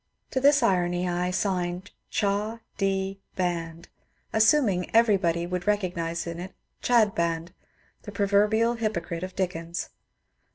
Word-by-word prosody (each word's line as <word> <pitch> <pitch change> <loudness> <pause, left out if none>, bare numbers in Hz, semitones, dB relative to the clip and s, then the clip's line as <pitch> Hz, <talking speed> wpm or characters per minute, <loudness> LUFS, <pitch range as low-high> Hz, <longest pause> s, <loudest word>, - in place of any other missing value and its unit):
To 260 - 0
this 280 -1 +5
irony 180 -3 +1
I 180 0 0
signed 180 0 -2 0.2
^'Cha. 210 +3 -1
D. 195 -1 -1 0.2
Band," 170 -2 -3 0.5
assuming 220 -3 +4
that 180 - -8
everybody 190 -7 +3
would 180 +1 -4
recognize 175 -5 -1
in 170 0 -5
it 185 +2 -8 0.3
^^Chadband," 170 -8 +2 0.5
the - - -9
proverbial 210 +3 +2
hypocrite 170 -7 -2
of 185 0 -6
Dickens. 170 -2 -3
185 Hz, 120 wpm, -26 LUFS, 175-210 Hz, 0.5 s, this